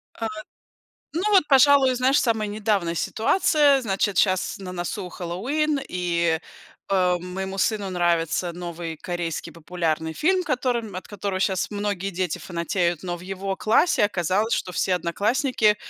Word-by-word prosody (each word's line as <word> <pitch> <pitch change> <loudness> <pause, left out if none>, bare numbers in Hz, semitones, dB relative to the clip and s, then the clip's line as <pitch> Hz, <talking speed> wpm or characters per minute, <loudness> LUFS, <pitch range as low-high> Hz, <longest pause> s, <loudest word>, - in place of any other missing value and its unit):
А, 225 - -3 0.9
ну 340 +4 -2
вот, 385 -6 +6
пожалуй, 270 -1 +6
знаешь, 260 +3 +3
самая 220 -3 0
недавняя 205 -5 0
ситуация. 285 - +3
Значит, 195 -3 0
щас 185 -1 +1
на 185 -2 -7
носу 180 +2 -4
Хэллоуин, 275 - -1
и, 170 -2 0 0.5
э, 180 -2 +3
моему 190 +2 -5
сыну 205 0 0
нравится 175 -1 0
новый 170 -2 -6
корейский 175 -2 -4
популярный 160 -1 -2
фильм, 365 - +1
которым 245 - -1
от 185 - -7
которого 200 -2 -3
щас 190 0 0
многие 200 -2 -2
дети 180 -2 -2
фанатеют. 170 -1 -1
Но 175 -1 -3
в - - -13
его 195 +1 -4
классе 220 +1 +3
оказалось, 200 +3 0
что 180 - -1
все 185 +1 +1
одноклассники 210 - +1
190 Hz, 140 wpm, -24 LUFS, 175-225 Hz, 0.9 s, вот